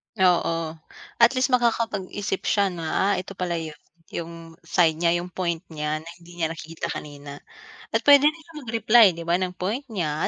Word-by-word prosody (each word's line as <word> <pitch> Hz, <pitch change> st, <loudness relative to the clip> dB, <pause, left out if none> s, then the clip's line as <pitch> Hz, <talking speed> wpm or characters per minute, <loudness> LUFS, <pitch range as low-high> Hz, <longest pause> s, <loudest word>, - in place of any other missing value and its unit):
Oo. 180 Hz, -4 st, +3 dB, 0.7 s
At 235 Hz, 0 st, +7 dB
least 255 Hz, +1 st, +1 dB
makakapag-isip 220 Hz, -5 st, 0 dB
siya 200 Hz, -2 st, +2 dB
na, 170 Hz, -2 st, -6 dB, 0.3 s
"ah, -, -, +2 dB
ito 190 Hz, +1 st, -8 dB
pala 175 Hz, -2 st, -2 dB
'yon," 160 Hz, -2 st, -7 dB, 0.4 s
'yong 170 Hz, 0 st, -5 dB, 0.3 s
side 165 Hz, -1 st, +2 dB
niya, 170 Hz, +1 st, +2 dB
'yong 175 Hz, -, -6 dB
point 170 Hz, -3 st, -1 dB
niya 155 Hz, -1 st, -3 dB
na 160 Hz, -, -14 dB
hindi 175 Hz, 0 st, -15 dB
niya 165 Hz, -, +1 dB
nakikita 165 Hz, 0 st, -6 dB
kanina. 145 Hz, -1 st, -8 dB, 0.5 s
At -, -, +1 dB
puwede 285 Hz, 0 st, +7 dB
din 305 Hz, -, +1 dB
siya 320 Hz, -1 st, -11 dB
mag-reply, 230 Hz, -2 st, +5 dB
'di 170 Hz, -, -7 dB
ba, 170 Hz, +2 st, +1 dB
ng 180 Hz, -1 st, -3 dB
point 210 Hz, +10 st, -3 dB
niya. 165 Hz, -, -2 dB
180 Hz, 180 wpm, -24 LUFS, 165-220 Hz, 0.7 s, At